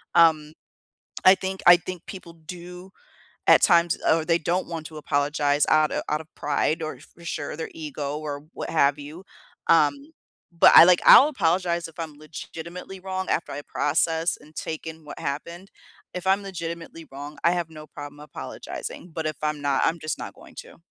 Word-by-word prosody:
Um 155 -2 +4 0.7
I 185 +1 +9
think 190 0 -5
I 175 - +10
think 180 0 -8
people 185 -3 -9
do 180 +3 -10 0.6
at - - +7
times 170 -2 +4
or 160 0 +3
they 165 0 +3
don't 175 +3 -1
want 165 -2 -5
to 160 - -14
apologize 145 0 +1
out 155 -1 +4
of - - -1
out 150 +1 0
of 160 - -16
pride 150 +2 0
or, 155 - -5
for 170 - -17
sure, 150 -2 -4
their 160 - -4
ego 150 -2 -5
or 145 -1 -6
what - - -6
have 140 -3 +3
you. 150 +5 -10 0.4
Um, 285 +2 +2 0.4
but - - +8
I - - +11
like 180 0 +5
I'll 280 - +9
apologize 175 - 0
if 165 - -17
I'm 155 -3 -6
legitimately 170 +4 -9
wrong 190 0 -4
after - - -1
I 145 - -5
process 160 +3 0
and 155 +1 -19
take 160 0 -5
in 160 0 -8
what 145 - -9
happened. 170 +7 -5 0.4
If 180 0 -6
I'm 195 +1 +3
legitimately 165 -3 -7
wrong, 145 +2 -9
I 170 - +5
have 175 -2 -2
no 155 -1 -11
problem 145 0 -10
apologizing. 160 +3 -8
But 160 0 -4
if 155 - -3
I'm 150 -1 -1
not, 140 -1 +1
I'm 165 +1 0
just 155 0 -3
not - - -7
going - - -16
to. - - -12
160 Hz, 185 wpm, -24 LUFS, 150-175 Hz, 0.7 s, I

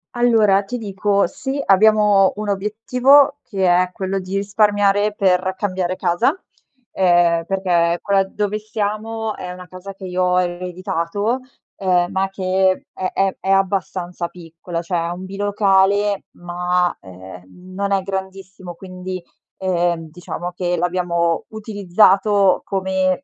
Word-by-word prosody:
Allora 220 -5 +3
ti 245 +5 -5
dico, 200 -2 0
sì 275 +1 -4
abbiamo 205 -1 +4
un 210 0 -4
obiettivo 250 +8 +3
che 195 -4 -2
è 180 0 +3
quello 195 0 -2
di 185 +1 -6
risparmiare 205 0 +2
per 185 -1 +1
cambiare 185 -3 -2
casa, 175 -2 +1 0.6
uhm, 175 -2 +3
perché 175 -3 +1
quella 195 -1 +2
dove 210 +2 -3
siamo 215 +1 -3
è 180 - -6
una 180 0 -11
casa 185 +2 -9
che 195 - -15
io 180 0 -2
ho 180 0 +3
ereditato, 180 +5 -2 0.4
ehm, 180 -2 +1
ma 190 0 0
che 190 0 0
è 185 -1 -3
è 195 -1 0
è 190 - -5
abbastanza 185 -2 -1
piccola, 170 0 -7
cioè 175 0 -2
è 170 +1 -3
un 180 +2 -8
bilocale 200 0 +1
ma, 180 0 -1
ehm, 95 0 -12 0.3
non 200 +1 -2
è 195 - +2
grandissimo. 190 -1 -6
Quindi, 185 0 -7 0.4
ehm, 175 -3 -1
diciamo 175 +1 -6
che 175 0 -2
l'abbiamo 170 -2 0
utilizzato 200 -2 +2
come 190 +3 0
190 Hz, 130 wpm, -20 LUFS, 180-205 Hz, 0.6 s, abbiamo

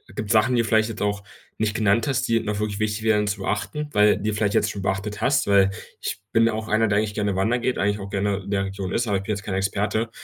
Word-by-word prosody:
gibt 105 +1 -3
Sachen, 115 +3 +4
die 115 - +3
vielleicht 110 0 +2
jetzt 115 - -6
auch 100 0 -1 0.4
nicht 110 -1 -1
genannt 110 +1 +2
hast, 130 -3 0
die 115 0 +3
noch 105 -2 -3
wirklich 105 -1 -2
wichtig 110 0 -1
wären 105 -2 +2
zu 100 0 -2
beachten, 145 +10 -3
weil 105 -2 +4
die 110 +2 -2
vielleicht 105 -1 0
jetzt 110 -1 +2
schon 100 - -6
beachtet 95 +2 -2
hast? 140 +1 +2
Weil, 100 -1 +5 0.3
ich - - -4
bin 115 0 +4
auch 110 0 -3
einer, 110 +1 +3
der 100 0 +2
eigentlich 105 -1 -2
gerne 100 -2 -1
wandert 115 +6 +1
geht, 125 - 0
eigentlich 105 +1 0
auch 100 - -7
gerne 100 0 0
in 100 0 -8
der 100 -1 +1
Region 95 -1 -5
ist, 120 +1 0
aber 100 -2 +1
ich 95 - -5
bin 105 - -4
jetzt 100 - -7
kein 95 - -3
Experte. 105 +3 -1
105 Hz, 270 wpm, -23 LUFS, 100-110 Hz, 0.4 s, Weil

